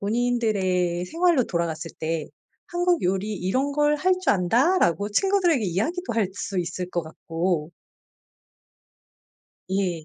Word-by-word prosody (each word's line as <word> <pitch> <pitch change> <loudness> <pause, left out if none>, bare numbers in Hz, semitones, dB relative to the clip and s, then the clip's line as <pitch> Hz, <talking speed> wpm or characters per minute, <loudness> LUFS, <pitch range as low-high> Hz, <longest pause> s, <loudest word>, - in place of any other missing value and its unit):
본인들의 200 -6 0
생활로 335 - +2
돌아갔을 165 -3 -3
때 160 -1 -2 0.4
"한국 350 -1 +1
요리 195 +4 0
이런 255 +10 -1
걸 295 +1 +2
할 370 +5 +2
줄 370 - +3
안다."라고 205 - +2
친구들에게 355 - +2
이야기도 235 - -1
할 220 -4 +1
수 200 -1 -4
있을 175 +1 -4
것 175 - -1
같고 165 0 -2 2.0
예. 185 -4 -1
200 Hz, 250 characters per minute, -24 LUFS, 175-295 Hz, 2.0 s, 줄